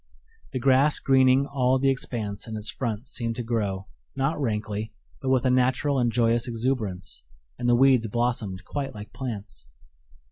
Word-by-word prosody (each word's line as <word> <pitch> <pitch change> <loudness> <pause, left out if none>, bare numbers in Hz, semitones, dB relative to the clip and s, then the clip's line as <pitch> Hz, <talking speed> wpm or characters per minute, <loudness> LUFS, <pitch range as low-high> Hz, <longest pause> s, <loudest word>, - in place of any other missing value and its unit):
The - - -3
grass 135 +3 +4
greening 130 0 +4
all 130 -2 +1
the 135 +1 +3
expanse 110 -6 -3
in 110 -1 -5
its 105 0 -2
front 115 0 -4
seemed 115 -3 -1
to 120 - -3
grow, 105 -5 -2 0.3
not 140 +3 0
rankly, 105 -2 -2 0.3
but 135 - -2
with 130 -1 +2
a 130 - +4
natural 130 +2 +2
and 120 -1 +2
joyous 115 0 +2
exuberance, 115 - -3 0.4
and 120 0 0
the 120 - +5
weeds 130 -2 +4
blossomed 110 -5 -2
quite 135 -3 -4
like 105 +1 -9
plants. 100 - -6
120 Hz, 165 wpm, -26 LUFS, 110-130 Hz, 0.4 s, the